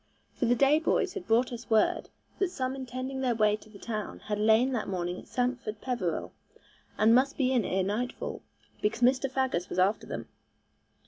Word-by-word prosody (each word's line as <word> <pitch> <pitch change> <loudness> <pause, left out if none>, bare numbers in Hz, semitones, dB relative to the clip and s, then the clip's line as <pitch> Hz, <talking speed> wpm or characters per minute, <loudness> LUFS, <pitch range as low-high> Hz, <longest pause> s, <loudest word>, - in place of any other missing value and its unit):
For 245 - -1
the 245 - +4
day 280 +4 +4
boys 360 +3 +1
had 395 - -6
brought 240 +3 +3
us 235 -1 -8
word 220 -2 +2 0.3
that 390 - +2
some 260 -6 -2
intending 260 +1 -5
their 250 -3 +1
way 215 -1 +3
to 215 - -17
the 210 - -13
town 215 -1 -4
had 210 -1 -3
lain 220 +4 +4
that 235 -4 -2
morning 180 -1 -2
at - - -14
Sampford 245 -4 -2
Peveril, 225 -11 -2 0.6
and 220 +1 +5
must 265 +3 +3
be 260 -2 +2
in 250 -4 +3
ere 190 0 0
nightfall, 215 +6 -3 0.4
because 210 +3 0
Mr. 260 +2 +3
Faggus 260 -9 -1
was - - -5
after 190 +3 +2
them. - - -5
240 Hz, 190 wpm, -29 LUFS, 215-260 Hz, 0.6 s, and